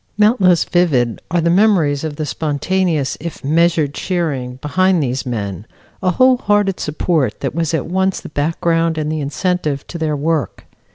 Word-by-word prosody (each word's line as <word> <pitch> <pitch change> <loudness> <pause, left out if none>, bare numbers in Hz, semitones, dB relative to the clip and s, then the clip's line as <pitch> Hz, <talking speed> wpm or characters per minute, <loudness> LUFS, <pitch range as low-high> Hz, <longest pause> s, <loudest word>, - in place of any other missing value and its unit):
Not 215 +2 +3
less 180 -2 +4
vivid 140 -10 +1
are 170 +1 +1
the 170 +1 +2
memories 175 -8 +3
of 155 -2 -4
the 155 - -3
spontaneous 155 0 -1
if 170 +1 -7
measured 160 0 +2
cheering 145 -10 -2
behind 175 +5 +1
these 130 0 -3
men 100 -4 -4 0.3
a 185 - +1
whole 255 +7 +4
hearted 205 -4 +1
support 150 -5 -1
that - - -2
was 165 0 -1
at 145 - -2
once 190 +2 0
the - - -10
background 165 +2 0
and 155 0 -2
the 155 -1 -2
incentive 150 -1 -2
to 170 - -7
their 155 -2 0
work. 150 -1 -2
160 Hz, 170 wpm, -17 LUFS, 145-180 Hz, 0.3 s, less